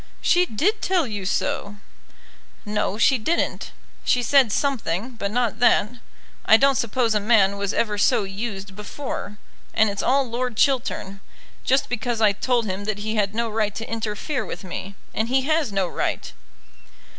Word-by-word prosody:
"She 355 0 +3
did 375 - 0
tell 365 -4 +2
you 205 -5 -4
so." 200 +2 -1 0.9
"No, 210 -1 -1
she 255 +3 +4
didn't. 325 +10 -1 0.3
She 245 - +2
said 265 -3 +4
something, 235 - -1
but 225 -4 -4
not 240 +1 -1
that. 220 -3 +4 0.5
I 220 - +7
don't 275 +3 +4
suppose 235 -1 +1
a 210 - +2
man 205 -2 +3
was 200 0 -2
ever 210 -2 0
so 205 - +3
used 195 0 -5
before; 210 0 -6 0.4
and 220 -1 +4
it's 200 - -3
all 270 0 +2
Lord 240 -1 -3
Chiltern; 235 -7 0 0.4
just 265 +1 +2
because 240 -1 -2
I 215 -2 +5
told 235 +3 0
him 195 0 -4
that 215 -1 -2
he 215 +1 -3
had 210 -1 0
no 235 0 0
right 215 -2 -1
to 225 - -5
interfere 225 +5 -3
with 185 - -7
me. 190 +2 -6 0.2
And 220 - -1
he 260 +2 +2
has 310 -4 +1
no 195 -2 0
right." - - -3
220 Hz, 170 wpm, -23 LUFS, 205-255 Hz, 0.9 s, I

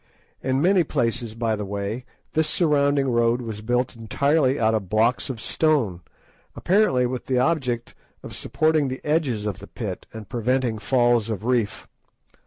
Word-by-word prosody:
In 130 +2 0
many 185 0 +4
places, 115 -5 -2
by 115 -1 0
the 105 - -4
way, 100 +5 -4 0.3
this 160 0 +2
surrounding 145 -4 +2
road 120 0 +2
was 110 -3 -6
built 120 +3 0
entirely 140 +5 +1
out 110 0 +3
of 100 -5 -2
blocks 115 +6 +1
of 125 -4 -4
stone, 115 - +1 0.5
apparently 175 -10 +2
with 125 0 -4
the 130 - +1
object 125 -4 0 0.3
of - - -8
supporting 155 -2 +1
the 130 0 -6
edges 145 -9 0
of 105 -3 -3
the 100 - -11
pit 100 -6 -6
and 110 -2 -9
preventing 120 0 0
falls 120 -2 +2
of 110 -1 -4
reef. 120 -5 0
120 Hz, 160 wpm, -24 LUFS, 110-140 Hz, 0.5 s, many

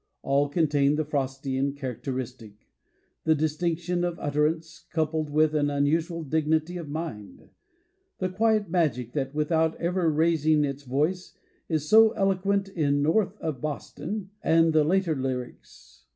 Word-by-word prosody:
All 140 +1 +2
contain 145 -2 +2
the 155 0 -1
Frostian 135 -1 -2
characteristic: 125 -5 -6 0.6
the 160 0 +3
distinction 165 +3 -1
of 175 -1 -2
utterance 155 +3 -1
coupled 155 -1 -1
with 155 +1 +2
an 145 -1 +1
unusual 160 +4 0
dignity 160 +3 0
of 165 -4 -7
mind; 145 -10 -7 0.7
the 185 - -1
quiet 215 +2 +1
magic 145 -9 0
that, 140 -1 -3
without 160 +1 +1
ever 170 -1 0
rais 160 0 +2
ing 155 -1 +4
its 140 0 -4
voice, 150 +8 -2 0.3
is 155 -2 -1
so 220 +2 +6
eloquent 195 0 +1
in 145 -6 0
"North 190 +5 +1
of 155 -9 -4
Boston" 170 +6 -5
and 165 0 +3
the 155 -1 +5
later 175 0 +1
lyrics. 125 - -6
155 Hz, 135 wpm, -26 LUFS, 140-170 Hz, 0.7 s, so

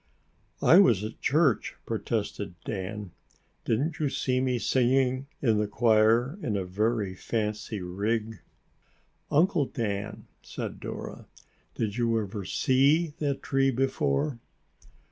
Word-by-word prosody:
"I 175 - +8
was 115 - +5
at 110 - -7
church," 145 -6 +2
protested 90 - -3
Dan. 100 -1 -5 0.5
"Didn't 145 +8 0
you 150 -2 +1
see 130 -1 0
me 130 -1 +1
singing 130 +2 +1 0.2
in 110 -5 +3
the 105 - 0
choir 115 - +3
in 105 - -1
a 95 - -2
very 105 +1 0
fancy 105 0 -3
rig?" 105 +5 -2 0.9
"Uncle 160 0 +3
Dan," 105 -2 -4 0.2
said - - -6
Dora, - - -7 0.5
"did 105 -1 -2
you 115 -2 +2
ever 100 -1 -4
see 145 - +2
that 140 -3 -2
tree 135 0 +2
before?" 130 - 0
115 Hz, 120 wpm, -28 LUFS, 105-135 Hz, 0.9 s, I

